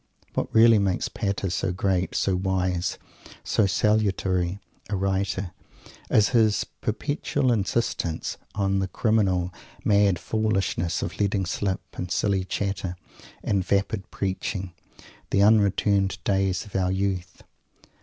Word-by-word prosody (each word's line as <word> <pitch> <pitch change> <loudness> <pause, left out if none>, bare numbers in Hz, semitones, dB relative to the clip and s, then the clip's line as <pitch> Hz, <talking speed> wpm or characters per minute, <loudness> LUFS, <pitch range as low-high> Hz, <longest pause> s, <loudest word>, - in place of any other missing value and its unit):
What - - -2
really 115 -1 +6
makes 95 -2 0
Pater 100 -3 -2
so 95 +1 -1
great, 95 0 0
so 95 - +1
wise, 90 -2 -1 0.5
so 105 - +2
salutary 95 -3 +1 0.3
a 105 - 0
writer 95 -1 -1 0.6
is 105 - +4
his 110 -4 +3
perpetual 140 +2 -1
insistence 100 -6 -1 0.2
on 100 -2 +1
the 95 - 0
criminal, 95 -5 +1 0.3
mad 100 -3 +4
foolishness 95 -4 -1
of - - -5
letting 100 -1 +1
slip, 95 +1 -1 0.2
in 90 - -3
silly 95 +1 +1
chatter 95 -2 -2 0.5
and 100 -2 +1
vapid 100 +1 -1
preaching, 95 -1 -3 0.6
the 100 - +3
unreturning 100 -2 +4
days 95 -2 +1
of 105 - -13
our 95 -1 +1
youth! 95 -1 -2
95 Hz, 120 wpm, -25 LUFS, 95-105 Hz, 0.6 s, really